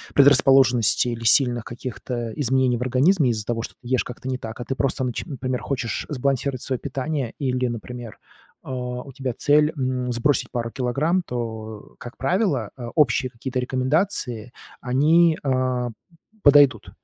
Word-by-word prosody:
предрасположенностей 130 -4 +5
или 115 0 -6
сильных 120 0 +3
каких-то 120 -1 -5
изменений 130 -2 +1
в - - -8
организме 130 +4 +3
из-за 110 -2 -2
того, 115 -1 -2
что - - -8
ты 120 - -15
ешь 130 0 +1
как-то 125 +1 -9
не 130 -1 -2
так. 110 +2 -8
А 120 - -5
ты 135 - -2
просто, 135 0 0
нач 125 -2 -3
например, 130 -4 -4
хочешь 125 -5 -3
сбалансировать 135 -1 -1
своё 130 -3 -2
питание. 135 -2 -3
Или, 130 -3 -1
например, 120 -1 -7 0.5
э, - - -18
у 125 +1 -5
тебя 130 -3 -3
цель, 150 +1 +3
м, 130 -1 -1
сбросить 120 +5 +1
пару 115 -2 -3
килограмм. 140 +8 0
То, 110 -5 -6
э, - - -28
как 120 - -10
правило, 145 - 0
э, 120 -2 -7
общие 130 -3 +3
какие-то 130 +1 -4
рекомендации, 130 - -1 0.3
они, 155 +6 +3
э, 130 -2 0 0.5
подойдут. 140 -5 +5
130 Hz, 160 wpm, -23 LUFS, 120-140 Hz, 0.5 s, предрасположенностей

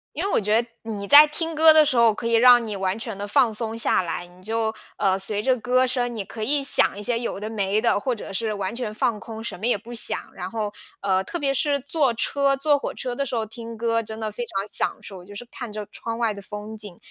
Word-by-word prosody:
因 325 - -1
为 400 - -1
我 - - +3
觉 210 +2 +2
得 - - -11 0.2
你 210 -3 -5
在 290 +8 +9
听 325 +2 -3
歌 315 0 +7
的 310 - +7
时 265 -4 +1
候， 230 -2 +5
可 230 - -7
以 230 0 +2
让 245 0 +7
你 210 -2 -5
完 190 +1 -1
全 225 -3 -6
地 205 0 -5
放 225 +2 +3
松 225 +1 -3
下 230 - +2
来， 175 +1 -4
你 180 +1 -19
就， 220 +2 -2 0.2
呃， 190 -1 +1
随 205 +2 +2
着 260 +1 +3
歌 250 +2 +2
声， 245 -1 -1
你 210 - -3
可 220 +3 -9
以 280 +5 +1
想 270 -7 +4
一 205 - -7
些 230 +2 +1
有 235 - -4
的 210 +2 -5
没 205 -1 0
的， 230 -3 +2
或 255 +2 -2
者 205 - -9
是 215 +2 -2
完 200 0 -4
全 235 -3 -4
放 235 -2 -1
空， 225 0 -9
什 225 - -6
么 225 - -2
也 245 - +2
不 235 +4 -11
想， 235 - +5 0.2
然 185 0 -6
后， 215 -1 -3 0.3
呃， 190 -1 +1
特 345 - -5
别 275 -4 0
是 285 0 +1
坐 280 -3 0
车 275 +4 +1
坐 285 +1 +2
火 - - -4
车 250 -2 -4
的 280 +3 -2
时 245 - -3
候， 220 -1 -1
听 230 +1 -9
歌 230 0 0
真 220 0 -8
的 215 -1 -4
非 240 +3 -5
常 195 -2 -3
享 - - -1
受， 185 -3 -10
就 205 +2 -12
是 245 - -7
看 245 -4 -7
着 210 -1 -5
窗 230 0 -6
外 230 -2 0
的 200 - -10
风 210 +2 -8
景， 205 -4 -9
225 Hz, 290 characters per minute, -23 LUFS, 210-250 Hz, 0.3 s, 在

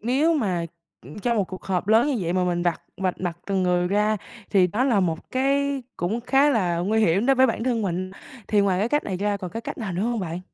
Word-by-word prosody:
nếu 275 +9 +2
mà, 185 - 0 0.4
ưm, 145 - -11
trong 235 +3 0
1 205 - +2
cuộc 185 +1 -9
họp 185 0 -2
lớn 225 +4 +5
như 295 - 0
vậy 170 -2 -1
mà 185 0 +1
mình 175 -1 0
vạch 175 -2 -1
vạch 185 -1 -2
mặt 175 -2 -3
từng 195 -2 0
người 180 -1 +1
ra 210 +2 +2 0.3
thì 190 -3 +5
đó 210 +8 0
là 235 -7 +3
một 165 -4 -2
cái 275 +1 0
cũng 205 +7 -2
khá 270 +4 +3
là 185 -9 +1
nguy 210 +6 +1
hiểm 195 +2 +2
đối 270 - +5
với 260 +1 +6
bản 230 -1 -2
thân 240 -3 0
mình, 185 -1 -2 0.4
thì 210 - +3
ngoài 195 -2 +2
cái 215 - +1
cách 295 +3 +1
này 190 - -3
ra 205 +2 0
còn 185 -3 -6
cái 225 - -5
cách - - -6
nào 215 -5 -4
nữa 175 +3 -2
hông 235 0 -1
bạn? 175 -1 -4
200 Hz, 260 wpm, -24 LUFS, 180-240 Hz, 0.4 s, với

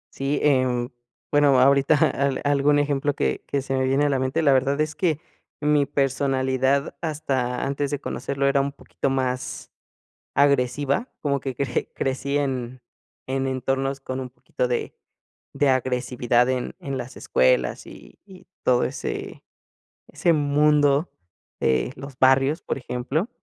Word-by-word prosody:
Sí, 140 +1 -1
em, 130 -4 +2 0.4
bueno, 145 -3 +4
ahorita 140 +3 +5
al 140 -3 +1
algún 145 0 +3
ejemplo 145 -1 0
que 65 -1 -1
que 140 -1 -1
se 135 - -3
me 130 - +1
viene 135 +2 +2
a - - +2
la 135 -2 +1
mente, 130 +5 0
la 140 -3 +5
verdad 135 +2 +1
es 155 0 0
que 160 -5 0 0.4
mi 150 -2 +2
personalidad 135 -1 0
hasta 135 -6 -2
antes 140 +1 -1
de 145 -1 -2
conocerlo 140 -1 -3
era 140 0 +3
un 140 - -2
poquito 140 - -4
más 130 -1 -3 0.6
agresiva, 140 - +2
como 140 -2 0
que 135 -1 -4
cre 130 -1 -2
crecí 135 +1 -2
en 130 -3 -2 0.4
en 135 0 -1
entornos 135 +1 -1
con 130 -1 -5
un 130 - -5
poquito 125 0 -4
de 120 - -2 0.6
de 145 - +1
agresividad 125 -1 +1
en 130 -1 -2
en 140 -1 -4
las 125 -1 -7
escuelas - - +1
y - - -14
y 190 -2 -15 0.2
todo 125 -1 +3
ese - - -5 0.7
ese 170 - +1
mundo 145 0 +3 0.5
de 65 - +1
los 140 -2 -10
barrios, 135 +3 +4
por - - -3
ejemplo. 135 - -2
135 Hz, 150 wpm, -24 LUFS, 130-145 Hz, 0.7 s, ahorita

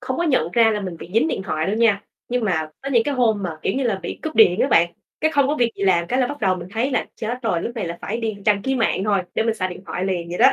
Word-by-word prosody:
không 255 0 -3
có - - 0
nhận 255 - +1
ra 230 -1 +5
là 210 -1 -1
mình 185 -4 -5
bị 170 - -11
dính 235 +8 +3
điện - - -2
thoại 155 -3 -2
đâu 205 - 0
nha. 220 -3 +3 0.3
Nhưng 245 -1 0
mà 160 -6 0
có 275 - -4
những 235 -4 +4
cái 290 - -1
hôm 225 -5 +2
mà, 165 -4 -4
kiểu - - 0
như 270 - 0
là, 220 -6 0
bị - - -5
cúp 315 - -4
điện 200 -3 +5
á - - +3
bạn. 170 -6 +4 0.3
Cái 315 - +2
không 285 -3 +3
có 295 - +1
việc 240 -4 +2
gì - - -5
làm 175 -3 +3
cái 255 +8 0
là 255 - +3
bắt 290 +3 -7
đầu 190 -3 +2
mình 175 0 -8
thấy 235 +5 0
là 255 - 0
chết 230 +3 -3
rồi, 180 -8 0
lúc 235 - -4
này 220 - -2
là 170 0 -5
phải 215 - -2
đi 220 -2 -2
đăng 205 -2 +3
ký 265 - 0
mạng 225 -5 +1
thôi 200 -3 +2
để - - +2
mình 225 0 0
xài 185 -4 -2
điện 180 0 -9
thoại 180 - -3
liền 175 -3 -2
vậy 175 - -5
đó. - - +7
215 Hz, 335 wpm, -22 LUFS, 185-245 Hz, 0.3 s, đó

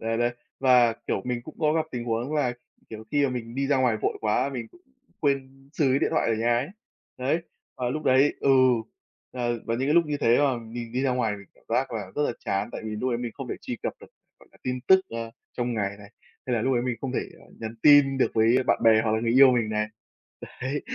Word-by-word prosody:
Đấy, 115 0 -1
đấy. 120 0 +1 0.3
Và, 125 -3 +5
kiểu, 95 - 0
mình 125 -1 -3
cũng 155 - -11
có 150 -1 +3
gặp 160 0 0
tình 120 -1 -4
huống 120 +5 -2
là, 135 -5 +1 0.4
kiểu, 110 0 -8
khi 145 -1 +3
mà 135 - +1
mình 120 -2 -5
đi 135 +1 -1
ra 140 0 +2
ngoài 125 -4 +2
vội - - -1
quá 110 +5 +1
mình 120 -4 -5
cũng 175 - -21 0.4
quên 135 -1 -2
xừ 150 - +1
cái 135 - +3
điện - - 0
thoại - - +1
ở 115 - +2
nhà 120 +2 +1
ấy. 135 +4 -3 0.5
Đấy, 140 +7 0 0.3
và 125 -2 -2
lúc 155 +4 -3
đấy 135 +3 +4
ừ, 140 - +2 0.8
ờ, 120 -1 -1
và 115 - 0
những 130 +4 -1
cái 150 - +3
lúc 170 -2 +4
như 150 -1 -1
thế 115 +1 +4
mà 135 -4 +2
mình 115 0 -8
đi 130 +2 -1
ra 135 - +2
ngoài 115 -5 0
mình 100 -1 -13
cảm - - -27
giác 125 +2 0
là 100 -4 -5
rất 150 - +1
là 145 - 0
chán 100 +2 0
tại - - -6
vì 110 - -4
lúc 125 +4 -1
đấy 120 - -1
mình 120 -2 -4
không - - -7
thể - - -2
truy - - -5
cập - - -2
được, - - -12 0.3
gọi - - -20
là, - - -22
tin 125 0 -3
tức, 190 0 +7
ờ, 115 0 -5 0.2
trong 120 -1 -2
ngày 100 -3 0
này, 100 0 -14 0.4
hay 125 - 0
là 110 - -1
lúc 135 - +1
đấy 120 - +1
mình 125 -1 -2
không 135 -2 -4
thể - - 0 0.4
nhắn 110 0 -5
tin 145 -2 +6
được - - +2
với 115 +3 +4
bạn - - +3
bè 110 -1 +6
hoặc 110 - +1
là 110 - +1
người 115 0 0
yêu 135 -1 +9
mình 115 -3 +1
này. 105 0 0 0.8
Đấy, 135 +3 -2
125 Hz, 265 wpm, -26 LUFS, 115-135 Hz, 0.8 s, yêu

